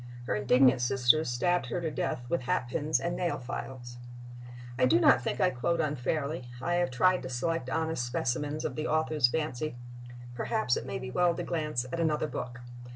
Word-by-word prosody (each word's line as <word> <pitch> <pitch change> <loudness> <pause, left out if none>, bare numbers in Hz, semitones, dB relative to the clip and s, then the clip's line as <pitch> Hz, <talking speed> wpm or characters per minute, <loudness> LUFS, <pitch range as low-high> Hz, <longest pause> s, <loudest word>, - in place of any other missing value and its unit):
Her - - -1
indignant 125 +4 +4
sisters 130 +4 +3
stabbed 125 +5 +1
her 120 - -2
to 165 -2 -2
death 125 - -2
with 170 - 0
hatpins 130 +5 0
and 170 - -2
nail 175 -1 -1
files. 120 -1 -7 0.8
I 125 - +5
do 120 - +4
not - - +5
think - - -3
I - - +3
quote 165 +7 -1
unfairly; 145 -1 -2
I 170 +7 -1
have 175 0 +1
tried 180 +9 +3
to 130 - -6
select 130 +2 -2
honest 160 -2 -1
specimens 145 +5 -2
of - - -3
the 155 0 -2
author's 155 -4 +2
fancy.... 155 0 -2 0.6
Perhaps 120 0 0
it - - -4
may - - -3
be 125 0 -6
well 175 +3 +2
to 175 - -3
glance 150 -7 -2
at 170 - -2
another 155 -2 +1
book. 125 -4 -6
140 Hz, 185 wpm, -29 LUFS, 125-160 Hz, 0.8 s, I